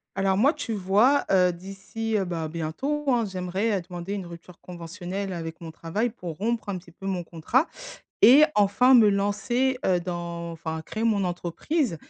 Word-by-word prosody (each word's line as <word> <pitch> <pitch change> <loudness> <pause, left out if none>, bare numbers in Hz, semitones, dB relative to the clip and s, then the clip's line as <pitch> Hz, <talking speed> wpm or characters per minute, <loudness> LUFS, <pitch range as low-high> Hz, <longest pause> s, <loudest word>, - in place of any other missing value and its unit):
Alors 195 -1 +1
moi, 270 +10 +4
tu 225 - -4
vois, 210 +9 +3
heu, 180 -2 +4
d'ici, 195 +5 -4
heu, 195 - -1
bah, 165 -2 -3
bientôt, 170 - -3
hein, 240 -3 +3
j'aimerais, 190 +2 -1
heu, - - -4
demander 175 +2 -6
une 200 -3 -4
rupture 170 0 -12
conventionnelle 180 +3 -6
avec 165 -2 -6
mon 165 - -7
travail 175 +9 -2
pour 180 -8 -8
rompre 225 +3 -2
un 200 - -2
petit 175 -1 -11
peu 195 +3 -10
mon 185 -3 -2
contrat 170 - 0 0.5
et 280 +6 +8
enfin 210 +6 +4
me 230 -4 +7
lancer, 210 +6 0
heu, 180 -2 +2
dans 170 -1 -5
enfin 160 -1 -5
créer 220 +8 -4
mon 210 -4 +2
entreprise. 180 - -2
195 Hz, 180 wpm, -25 LUFS, 175-225 Hz, 0.5 s, et